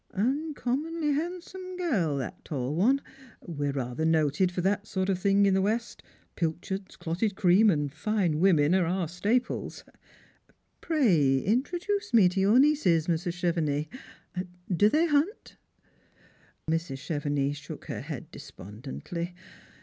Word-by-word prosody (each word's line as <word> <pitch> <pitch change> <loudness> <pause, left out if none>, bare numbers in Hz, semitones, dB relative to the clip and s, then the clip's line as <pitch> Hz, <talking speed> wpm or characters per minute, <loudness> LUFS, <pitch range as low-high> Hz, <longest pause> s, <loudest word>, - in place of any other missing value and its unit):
" - - -33
Uncommonly 295 - -1
handsome 360 +4 -5
girl, 200 - 0
that 130 -4 -6
tall 135 -2 -3
one. 235 - +3 0.5
We're 145 -4 -2
rather 125 +2 -3
noted 160 +2 +2
for 180 - -2
that 200 +3 0
sort 190 -1 -1
of 190 -2 +1
thing 200 +1 +3
in 195 - +3
the 190 - +3
west; 225 +4 -2 0.3
pilchards, 180 +4 -3
clotted 190 +5 -2
cream, 190 +5 +5
and 145 -6 0
fine 175 -2 0
women, 165 -4 +4
are 185 -3 +3
our 180 0 -1
staple. 205 +9 -1 1.1
Pray 180 - +3
introduce 350 - -1
me 205 -5 +7
to 185 +2 -2
your 200 +5 +4
nieces, 260 - +4
Mrs. 170 +1 -1
Chevenix. 165 - -1 0.8
Do 205 +5 +5
they 310 +7 +3
hunt? 315 +7 0 0.6
" - - -32
Mrs. 165 -3 -1
Chevenix 145 -1 -2
shook 150 - -9
her - - -5
head - - -7
despondently. 140 - -7
185 Hz, 135 wpm, -28 LUFS, 160-245 Hz, 1.1 s, me